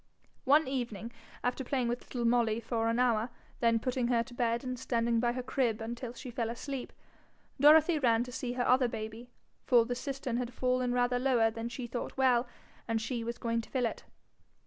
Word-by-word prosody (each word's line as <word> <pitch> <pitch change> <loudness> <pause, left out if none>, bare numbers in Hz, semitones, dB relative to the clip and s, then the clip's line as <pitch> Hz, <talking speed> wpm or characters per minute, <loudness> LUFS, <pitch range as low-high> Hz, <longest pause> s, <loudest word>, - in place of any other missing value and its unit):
One 295 +2 +5
evening, 235 -4 -3 0.3
after 250 +2 -1
playing 255 -1 -1
with 240 +1 -1
little 240 -2 -2
Molly 230 -2 +2
for 230 0 -1
an 230 - +1
hour, 240 -2 +2 0.3
then 230 -1 +3
putting 250 +1 -1
her 235 -1 +2
to 240 - -14
bed 235 0 0
and 255 -1 -4
standing 235 -2 +1
by 240 0 +1
her 255 0 -4
crib 245 -4 0
until 235 +2 -5
she 250 +1 -8
fell 230 -1 -2
asleep, 255 +2 -5 0.7
Dorothy 310 +3 +6
ran 235 -3 +3
to 250 - -8
see 245 0 -3
to - - -9
her 245 - +1
other 255 0 +4
baby; 225 +1 -6 0.4
for 240 -3 +5
the 245 - -2
cistern 260 -1 -3
had 245 0 -4
fallen 255 -1 +1
rather 245 0 +1
lower 245 -4 +3
than 225 +1 -5
she 245 +1 -5
thought 240 +2 -5
well, 250 -2 +3 0.4
and 225 -1 0
she 230 +1 -3
was 235 +1 -4
going 230 -1 -1
to - - -15
fill 255 -2 0
it. 230 - -4
245 Hz, 205 wpm, -31 LUFS, 230-255 Hz, 0.7 s, Dorothy